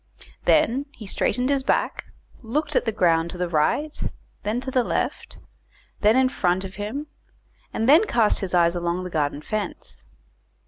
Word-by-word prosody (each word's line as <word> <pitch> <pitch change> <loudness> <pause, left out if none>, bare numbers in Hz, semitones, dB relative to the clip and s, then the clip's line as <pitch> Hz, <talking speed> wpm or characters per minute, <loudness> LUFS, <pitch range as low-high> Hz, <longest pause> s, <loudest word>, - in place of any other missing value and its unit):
Then 270 +5 +3
he 220 - -10
straightened 250 +6 +1
his 275 -1 +2
back, 265 - 0 0.4
looked 290 +5 -2
at - - +2
the 225 - +1
ground 170 -5 +2
to 180 - -7
the 180 0 -1
right, 175 - 0 0.4
then 215 +4 -1
to 265 - -5
the 255 -1 +2
left, - - -2 0.6
then 215 +2 +4
in 260 0 +4
front 185 -6 0
of 190 - -8
him, 215 +9 -4 0.7
and 225 - -1
then 315 +10 +7
cast 225 - +2
his 185 -2 -2
eyes 170 0 +4
along 175 +1 -1
the 180 - -6
garden 150 -2 -1
fence. 210 - -5
210 Hz, 170 wpm, -24 LUFS, 175-260 Hz, 0.7 s, then